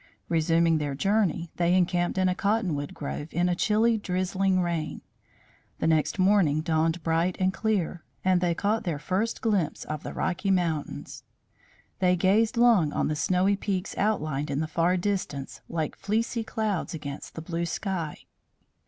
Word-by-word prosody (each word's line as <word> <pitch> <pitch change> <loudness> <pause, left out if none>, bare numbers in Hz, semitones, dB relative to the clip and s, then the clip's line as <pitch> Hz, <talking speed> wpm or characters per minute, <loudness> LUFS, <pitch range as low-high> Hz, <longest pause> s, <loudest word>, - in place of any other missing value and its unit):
Resuming 165 0 +3
their 145 -2 -2
journey, 195 -1 +1
they 175 +1 +3
encamped 175 0 +1
in 185 0 +3
a 180 - +2
cottonwood 185 -8 -1
grove 145 0 -5
in 175 +2 +1
a 180 - +2
chilly 220 +5 +2
drizzling 185 0 0
rain. 170 -3 -2 0.8
The - - -2
next 160 +2 +2
morning 185 -6 +3
dawned 160 +1 0
bright 165 +2 +1
and 185 0 +2
clear, 180 -3 -1 0.2
and 185 -1 +3
they 175 -2 +1
caught 210 +5 0
their 170 -6 -2
first 190 +9 -2
glimpse 205 -9 0
of 155 -1 -5
the - - -6
Rocky 185 +2 -1
Mountains. 170 -6 -1 0.8
They 180 -1 +4
gazed 210 +6 +2
long 225 -11 +5
on - - 0
the 155 - 0
snowy 185 +5 +2
peaks 195 -1 -3
outlined 155 -9 0
in 140 0 -1
the 160 - 0
far 170 +3 +1
distance 180 -8 -3
like 160 -3 -2
fleecy 225 +3 -1
clouds 210 -6 -2
against 145 -2 -7
the 160 - -5
blue 170 +1 -2
sky. 170 -4 -3
180 Hz, 160 wpm, -27 LUFS, 160-195 Hz, 0.8 s, long